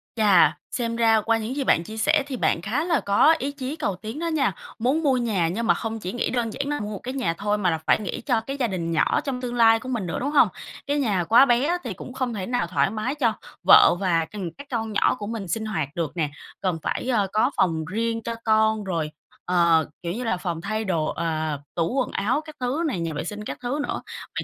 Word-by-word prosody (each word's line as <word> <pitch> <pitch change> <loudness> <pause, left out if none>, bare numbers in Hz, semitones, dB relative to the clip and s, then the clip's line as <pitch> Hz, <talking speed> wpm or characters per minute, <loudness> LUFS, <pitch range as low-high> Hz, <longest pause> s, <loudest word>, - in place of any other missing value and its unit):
Chà, 210 -4 +5
xem 230 -2 -2
ra 225 -2 +4
qua 225 +2 +2
những 225 +4 -4
gì 280 - -1
bạn 165 - +3
chia 220 +5 -9
sẻ 290 +6 +3
thì 260 -3 -4
bạn 165 - +1
khá 245 - -1
là 335 -4 +2
có 255 +11 +4
ý 280 +2 -2
chí 280 +1 -5
cầu 200 - -2
tiến 220 - -7
đó 335 - -2
nha. 300 -6 +1 0.3
Muốn 275 +8 +1
mua 265 -3 +3
nhà 205 -9 +1
nhưng 225 +7 -2
mà - - +6
không 225 0 -4
chỉ 185 0 -5
nghĩ 245 - -1
đơn 235 -3 -1
giản 280 - -3
là 295 0 -1
mua 210 0 -4
một 195 - -6
cái 255 +2 -4
nhà 185 -12 0
thôi, 210 +1 0
mà 185 -3 +1
là 160 - 0
phải - - +4
nghĩ 200 -5 -4
cho 240 -5 +1
cái 275 +5 -5
gia 245 -3 +1
đình 170 -4 -3
nhỏ 165 - +2
trong 260 -3 -3
tương 245 -1 -4
lai 225 -1 +5
của 255 - -8
mình 225 -7 -2
nữa, 170 - -3
đúng 280 +3 -2
hông? 300 - +6 0.4
Cái 290 +1 +1
nhà 200 -9 +1
quá 230 +9 +6
bé 240 +1 +3
á, 350 +2 +1
thì 230 -6 -4
cũng 250 +7 -9
không 250 -3 -2
thể 190 -3 -4
nào 245 -7 -1
thoải 180 +2 +1
mái 220 +7 -2
cho 235 -7 +2 0.3
vợ - - +8
và, 170 -4 +1
ừm, 190 -6 -5
các 285 - -10
con 225 -2 -2
nhỏ - - +3
của 205 - -6
mình 220 -4 -4
sinh 220 +6 -2
hoạt 160 -10 -2
được 165 -4 -2
nè. 155 -3 0 0.3
Cần 180 -4 0
phải, - - -2
ờ, 210 -5 +2
có 235 +6 +3
phòng 160 -3 +1
riêng 225 +5 -2
cho 230 0 -3
con 220 -1 +3
rồi, 165 -5 -2 0.3
ờ, 170 -3 +3 0.2
kiểu 170 - -2
như 245 +3 -4
là, 185 -6 0
phòng 170 -3 -4
thay 215 +3 -2
đồ, 165 -5 0
ờ, 155 -3 -2 0.2
tủ 170 +7 0
quần 260 - 0
áo 230 +10 0
các 310 - -10
thứ 260 +7 -1
này, 215 - -2
nhà 165 -2 -2
vệ 150 - -3
sinh 210 +4 -6
các - - -5
thứ 265 +5 -2
nữa. - - -3 0.3
Vậy - - -2
220 Hz, 265 wpm, -24 LUFS, 185-250 Hz, 0.4 s, vợ